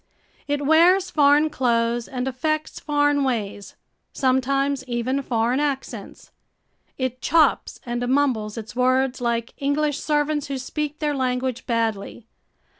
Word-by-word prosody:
It 290 Hz, 0 st, -1 dB
wears 350 Hz, +5 st, +4 dB
foreign 295 Hz, +1 st, +4 dB
clothes 235 Hz, -3 st, 0 dB
and 255 Hz, 0 st, -4 dB
affects 310 Hz, +4 st, -2 dB
foreign 290 Hz, -1 st, +1 dB
ways, 210 Hz, -6 st, -3 dB, 0.4 s
sometimes 275 Hz, +1 st, +1 dB
even 250 Hz, +2 st, -1 dB
foreign 240 Hz, 0 st, 0 dB
accents. 285 Hz, -2 st, -4 dB, 0.7 s
It 255 Hz, -1 st, -3 dB
chops 310 Hz, -2 st, +2 dB
and 240 Hz, 0 st, -2 dB
mumbles 245 Hz, -6 st, 0 dB
its 220 Hz, -1 st, -8 dB
words 255 Hz, +1 st, +1 dB
like 235 Hz, -1 st, -1 dB
English 290 Hz, +1 st, 0 dB
servants 295 Hz, -1 st, 0 dB
who 275 Hz, -1 st, -3 dB
speak 295 Hz, +3 st, -4 dB
their 300 Hz, -2 st, -1 dB
language 255 Hz, -1 st, -2 dB
badly. 225 Hz, -2 st, -2 dB
265 Hz, 120 wpm, -23 LUFS, 240-290 Hz, 0.7 s, wears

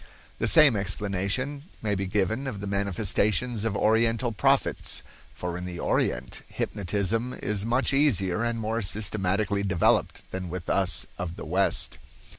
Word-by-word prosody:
The -, -, +1 dB
same 150 Hz, -7 st, +7 dB
explanation 100 Hz, +8 st, -2 dB, 0.2 s
may 105 Hz, -1 st, +1 dB
be 95 Hz, -1 st, -1 dB
given 105 Hz, +7 st, 0 dB
of 110 Hz, -7 st, -4 dB
the 100 Hz, -, -5 dB
manifestations 100 Hz, +3 st, 0 dB
of 110 Hz, -3 st, -1 dB
Oriental 115 Hz, +2 st, +2 dB
prophets—for 90 Hz, -3 st, -1 dB
in 90 Hz, -, -6 dB
the 90 Hz, -1 st, -6 dB
Orient -, -, -1 dB
hypnotism 105 Hz, +5 st, -1 dB
is 105 Hz, 0 st, -2 dB
much 125 Hz, +3 st, +1 dB
easier 110 Hz, -9 st, +2 dB
and 115 Hz, -1 st, -1 dB
more 110 Hz, +1 st, -1 dB
systematically 100 Hz, 0 st, 0 dB
developed 95 Hz, -4 st, +1 dB
than 95 Hz, -1 st, -4 dB
with 90 Hz, -1 st, -4 dB
us 95 Hz, -2 st, +1 dB
of 85 Hz, -1 st, -4 dB
the 105 Hz, -, -8 dB
West. 95 Hz, +4 st, 0 dB
100 Hz, 140 wpm, -27 LUFS, 95-115 Hz, 0.2 s, same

